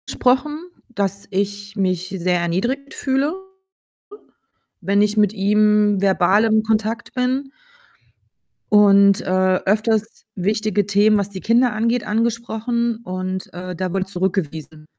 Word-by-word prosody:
sprochen, 260 +4 +1 0.3
dass 200 -3 -3
ich 200 +1 -3
mich 185 -2 -1
sehr 180 0 0
erniedrigt 240 +12 -2
fühle, 275 +3 -1 1.5
wenn 200 +2 +2
ich 210 0 0
mit 210 -2 +3
ihm 210 0 +2
verbal 195 +2 +3
im 220 -1 +3
Kontakt 220 +1 -2
bin 260 +2 -1 1.2
und, 200 -1 +6
äh, - - -9 0.4
öfters 215 +2 0
wichtige 210 +1 0
Themen, 205 +2 +3
was 200 -1 -2
die 190 -2 -8
Kinder 235 +1 +2
angeht, 230 +2 -1
angesprochen 230 +1 -1
und, 185 -1 -5
äh, 180 0 -7
da 185 +1 -3
wurde 190 0 -1
zurückgewiesen. 160 -5 -4
210 Hz, 120 wpm, -20 LUFS, 190-225 Hz, 1.5 s, und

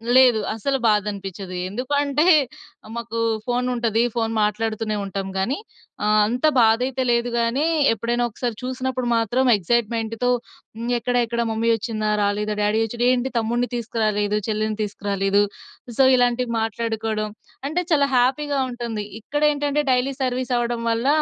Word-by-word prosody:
లేదు 255 -4 +6
అస్సలు 270 +5 -1
బాధనిపిచ్ఛదు. 200 -3 -1
ఎందుకంటే, 280 - 0 0.7
మాకు 235 -1 -4 0.3
ఫోను 250 0 0
ఉంటది. 230 -2 +1
ఫోను 225 -1 0
మాట్లాడుతూనే 215 0 -1
ఉంటాం 195 0 -4
గానీ, 235 +10 0 0.5
ఆహ్, 215 0 +4
అంత 245 +6 -1
బాధైతే 245 +3 +3
లేదు 235 0 +1
గానీ, 235 +6 +1 0.3
ఎప్పుడైనా 235 +2 -1
ఒకసారి 235 +1 -4
చూసినప్పుడు 255 0 -2
మాత్రం 240 +3 +2
ఎక్సైట్‌మెంట్‌తో 225 +3 0 0.5
హ్మ్. 235 +1 -2
ఎక్కడ 245 +2 -2
ఎక్కడ 235 +1 -2
మమ్మీ 225 +1 0
వచ్చిందా? 215 -1 -2
రాలేదా? 210 +1 0
డ్యాడీ 210 +2 +2
వచ్చాడ? 235 +2 -3
ఏంటి 255 +1 -1
తమ్ముడిని 240 +2 0
తీసుకురాలేదు. 215 -3 0
చెల్లెని 215 0 -1
తీసుకురాలేదు. 200 -1 0 0.6
సో 265 - +7
ఇలాంటివి 245 0 +1
మాట్లాడుకోవడం, 225 -1 -2 0.4
అంటే 345 +5 -1
చాలా 285 -2 +4
హ్యాపీగా 275 +3 +1
ఉంటుంది. 235 -4 -4 0.2
ఇక్కడ 290 +6 -3
ఏంటంటే 290 0 0
డైలీ 255 +2 +1
సర్వీస్ 255 0 -1
అవ్వడం 240 -1 -1
వల్ల, 230 +3 0
230 Hz, 135 wpm, -22 LUFS, 215-250 Hz, 0.7 s, సో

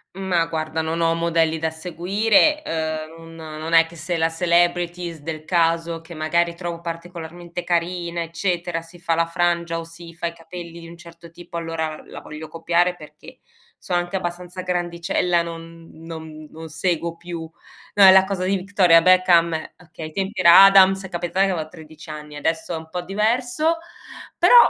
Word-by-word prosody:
Ma 185 -3 0
guarda 160 -1 -2
non 160 +1 -2
ho 165 0 +2
modelli 165 -1 +1
da 160 0 -1
seguire. 195 - +2
Uhm, 160 0 -4
un 165 - -12
non 160 0 -7
è 165 0 +6
che 165 +1 -14
se 170 +2 -3
la 165 0 +2
celebrities 175 0 0
del 155 0 -6
caso 165 -1 +1
che 165 +1 -12
magari 170 +2 +1
trovo 170 -1 -6
particolarmente 170 0 -7
carina 170 0 -1
eccetera, 170 0 -2
si 165 +2 -16
fa 170 -1 0
la 165 0 +2
frangia 170 -1 0
o 165 - -7
si 165 0 -12
fa 170 +1 -3
i 170 - -5
capelli 170 0 -10
di 165 - -11
un 170 - -12
certo 170 -1 -14
tipo 170 0 -12
allora 165 -2 -3
la - - -9
voglio 155 0 -9
copiare 170 +2 +1
perché - - -14 0.4
sono 175 -1 -1
anche 175 +2 -3
abbastanza 180 0 -5
grandicella, 175 0 0
non 165 0 -10
non 160 -1 -9
non 160 0 -9
seguo 170 +1 -2
più 170 -1 -7 0.5
no 205 - +6
è 190 - +11
la 190 0 +7
cosa 190 -2 -3
di 195 +1 +1
Victoria 185 -3 +4
Beckham 175 -2 +5 0.2
okay, 165 -2 -10
ai - - -11
tempi 195 +3 -3
era 170 +2 +9
Adams 195 0 +6
è - - -8
capitato 175 +2 0
che 195 - 0
avevo 160 -4 -3
13 160 0 -13
anni, 150 -1 -8
adesso 160 +3 -2
è - - -2
un 160 0 -10
po' 180 +2 -4
diverso; 245 - 0 0.6
però, - - +5
170 Hz, 180 wpm, -22 LUFS, 165-180 Hz, 0.6 s, è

